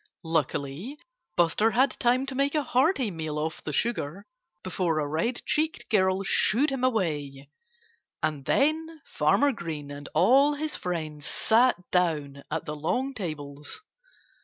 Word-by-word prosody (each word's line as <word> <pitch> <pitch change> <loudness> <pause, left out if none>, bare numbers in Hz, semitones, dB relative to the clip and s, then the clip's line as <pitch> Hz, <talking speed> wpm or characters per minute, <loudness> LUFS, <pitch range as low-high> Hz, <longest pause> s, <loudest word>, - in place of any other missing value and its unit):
Luckily 160 - -2 0.4
Buster 175 +6 +3
had 255 +3 +3
time 250 +2 +2
to 270 - -5
make 275 +3 0
a 300 - +2
hearty 260 - +2
meal 160 -3 -4
off 160 +1 -3
the 150 - -4
sugar 200 -1 -1 0.4
before 180 -3 -1
a 150 - 0
red 165 - -1
cheeked 315 +1 -1
girl 190 -2 +3
shooed 255 +8 +3
him 265 -2 -3
away. 145 - -1 0.7
And 150 -3 -1
then 315 +2 +1
Farmer 155 - +2
Green 155 - -6
and 145 0 -8
all 270 - +5
his 305 +1 -3
friends 155 -4 -4
sat 240 +3 +3 0.2
down 150 -6 0
at 160 +1 -3
the 150 - -4
long 250 - -1
tables. 150 - -6
185 Hz, 140 wpm, -27 LUFS, -, 0.7 s, all